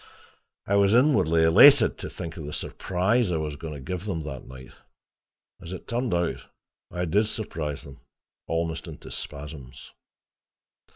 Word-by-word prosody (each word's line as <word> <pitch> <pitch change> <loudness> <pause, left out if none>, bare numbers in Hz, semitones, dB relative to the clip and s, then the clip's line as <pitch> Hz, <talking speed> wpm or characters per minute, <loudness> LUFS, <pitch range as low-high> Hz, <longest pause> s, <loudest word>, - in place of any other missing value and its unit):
I 100 - +2
was 100 +2 +4
inwardly 120 - +4
elated 110 - +7
to - - -6
think 80 -1 -7
of 80 - -7
the 75 - -6
surprise 95 +4 0
I 85 - 0
was 75 -2 -3
going 75 +1 -7
to - - -7
give 90 +7 -5
them 95 -6 -2
that 75 -4 -7
night; 65 0 -11 0.9
as 85 - -8
it 95 - -9
turned 120 -5 -1
out, 85 0 -1 0.5
I 90 0 -3
DID 105 +6 +2
surprise 80 -10 -4
them 70 0 -13 0.5
almost 80 +1 -2
into 80 -3 -10
spasms. 70 -3 -8
85 Hz, 155 wpm, -26 LUFS, 75-100 Hz, 0.9 s, elated